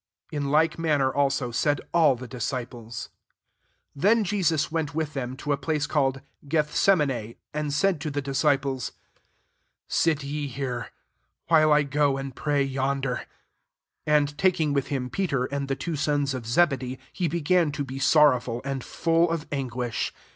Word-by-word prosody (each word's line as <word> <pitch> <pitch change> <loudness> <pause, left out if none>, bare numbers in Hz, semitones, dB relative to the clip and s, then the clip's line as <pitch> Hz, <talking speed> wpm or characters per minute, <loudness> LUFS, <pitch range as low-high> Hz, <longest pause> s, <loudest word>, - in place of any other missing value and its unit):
In 145 -2 -2
like 155 +3 +2
manner 145 -5 +2
also, 135 -3 +1
said 145 +5 +1
all 160 -6 +5
the 125 +1 -8
disciples. 120 -1 -5 0.9
S^ 140 - -10
Then 220 +3 +4
Jesus 175 -7 +1
went 155 -3 -2
with 155 -2 -2
them 130 -1 -4
to 145 - -3
a 140 - +2
place 150 +1 -1
called 135 -3 0 0.3
Gethse 150 +2 +1
mui6, 135 - +1 0.2
and 150 0 -2
sidd 170 +4 +1
tcrthe 155 -1 -4
diaeiplef^ 135 -1 0 0.5
" - - -48
Sit 155 -3 +2
ye 145 +1 -3
here, 125 -3 -4 0.6
while 155 -2 +5
i 150 0 +5
go 145 0 +2
uid 135 -1 -5
pray 145 +1 0
yonder." 135 -1 -1
37 - - -10 0.8
And 145 -1 +2
taking 165 -6 +2
with 140 -2 0
him 130 -3 -3
Peter, 140 -10 0
and 140 +1 -3
the 135 - -1
two 165 +3 -4
sons 145 -1 0
of 125 -4 -5
Zebedee, 130 -2 +1 0.2
he 175 - -1
began 170 0 +2
to 145 - -2
be 135 0 -6
sor 150 +2 +6
rowful, 120 -1 -3
and 135 -2 -3
full 165 +1 +1
of 165 -2 -2
anguish. 125 -4 -2
145 Hz, 165 wpm, -26 LUFS, 135-155 Hz, 0.9 s, sor